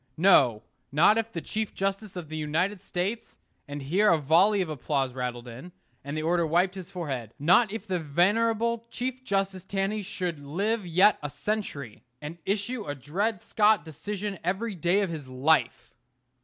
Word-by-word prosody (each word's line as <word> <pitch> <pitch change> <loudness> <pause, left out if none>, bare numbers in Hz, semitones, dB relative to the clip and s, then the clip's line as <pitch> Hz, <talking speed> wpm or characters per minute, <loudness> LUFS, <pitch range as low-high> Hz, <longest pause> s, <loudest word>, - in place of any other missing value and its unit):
No, 125 - +5 0.3
not 170 +10 +5
if 225 0 -3
the 170 - -4
Chief 215 +4 -4
justice 195 +1 -2
of 175 -3 -6
the 155 - -7
United 170 +6 -1
States 200 +4 -4 0.3
and 145 0 -6
here 190 +10 +3
a 170 - +5
volley 170 +8 +4
of 180 - -1
applause 140 -3 -1
rattled 125 -1 -4
in, 130 +10 -10 0.3
and 140 +3 -5
the 155 - -2
orator 170 0 +2
wiped 175 +4 +2
his 185 -2 -8
forehead 135 - -5
not 180 - +4
if 220 -1 -5
the 185 -4 -1
venerable 225 +9 +1
Chief 255 +2 -4
justice 195 -4 -1
Taney 195 +2 -1
should 185 -5 -4
live 195 +8 -2
yet 185 +5 +5
a 145 - -4
century, 145 - -4 0.2
and 155 +3 -8
issue 210 +4 -1
a 145 - -3
Dred 185 - -2
Scott 210 -2 +3
decision 200 +5 -5
every 195 +6 -1
day 180 +3 +2
of 195 -4 -1
his 150 -5 -6
life. 130 -2 +1
180 Hz, 170 wpm, -27 LUFS, 150-205 Hz, 0.3 s, No